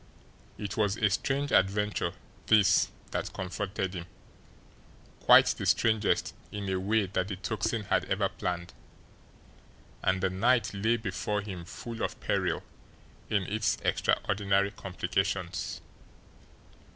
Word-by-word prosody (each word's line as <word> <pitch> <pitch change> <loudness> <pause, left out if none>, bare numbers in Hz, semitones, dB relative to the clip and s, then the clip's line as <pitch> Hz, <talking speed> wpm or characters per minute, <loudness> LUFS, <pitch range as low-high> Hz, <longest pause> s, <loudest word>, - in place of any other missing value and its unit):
It 100 -1 -5
was 105 -1 +1
a 105 -4 +2
strange 140 +7 0
adventure 105 +2 +2 0.3
this 100 -4 +5 0.2
that - - -2
confronted 95 0 -3
him, 85 -2 -6 1.1
quite - - +8
the - - -1
strangest 110 -2 +2 0.2
in 100 -1 -4
a 95 - 0
way 105 +2 +2
that 95 -1 -1
the 100 - -3
Tocsin 105 +3 -2
had - - +1
ever - - +1
planned 90 0 -4 1.3
and 95 - +2
the 95 0 0
night 115 +4 +2
lay 110 +4 +1
before 105 -1 -2
him 95 -4 -7
full 115 +5 -7
of - - -2
peril - - 0 0.7
in 100 -3 +2
its 110 +4 0
extraordinary 100 0 +1
complications. 95 -1 -2
100 Hz, 120 wpm, -29 LUFS, 95-110 Hz, 1.3 s, quite